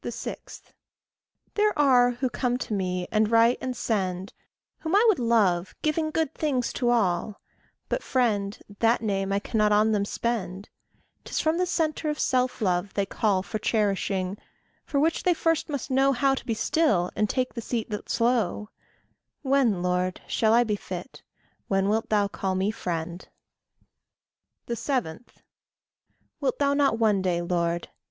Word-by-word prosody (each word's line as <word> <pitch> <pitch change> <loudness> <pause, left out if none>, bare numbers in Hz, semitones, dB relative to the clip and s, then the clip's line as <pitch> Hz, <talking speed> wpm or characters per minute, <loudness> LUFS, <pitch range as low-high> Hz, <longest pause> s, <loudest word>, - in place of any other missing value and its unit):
6. - - -7 0.9
There 420 0 +1
are 255 -4 +5
who 245 +2 -2
come 245 -1 0
to 235 - -4
me, 180 -2 -2
and 215 0 +2
write, 230 +2 +4
and 255 -1 -3
send, 190 -5 -2 0.5
Whom 320 +3 -1
I 425 +3 +5
would 425 -9 +4
love, 205 -7 +2
giving 310 +1 0
good 315 -2 -1
things 265 -6 -1
to 245 -2 0
all, 205 -3 +1 0.5
But - - -1
friend 210 -5 0 0.2
that 230 0 +2
name 195 -2 -1
I 200 - +2
cannot 210 +1 +1
on 210 +1 +4
them 205 -2 +1
spend; 200 -4 -3 0.5
'Tis - - -3
from 320 +2 +1
the 365 - +1
centre 315 -2 -1
of 300 - -2
self 255 -1 0
love 185 0 0
they 200 - +1
call 195 -1 0
For 195 +4 -4
cherishing 200 -3 0 0.4
for 280 - -1
which 320 +3 +1
they 355 -1 +2
first 330 0 0
must 280 -3 -4
know 270 +1 +4
How 270 +2 +2
to 270 - -4
be 225 - 0
still, 215 - +1
and 210 -1 +1
take 255 -1 -1
the 235 - -5
seat 225 -1 -3
that's 210 +3 -3
low: 230 -3 +1 0.7
When, 260 -9 +2
Lord, 180 0 0
shall 220 0 +2
I 240 - +5
be 215 -3 -1
fit 185 +5 -8 0.5
when 195 0 +1
wilt 220 +2 0
thou 205 -2 +2
call 190 -1 -3
me 190 +3 +1
friend? 175 -3 -5 1.4
7. 235 - -2 1.1
Wilt 275 -3 -1
thou 280 -1 +2
not 280 -5 +2
one 215 -4 +2
day, 175 -2 0
Lord? 170 -1 -1
220 Hz, 160 wpm, -26 LUFS, 195-260 Hz, 1.4 s, are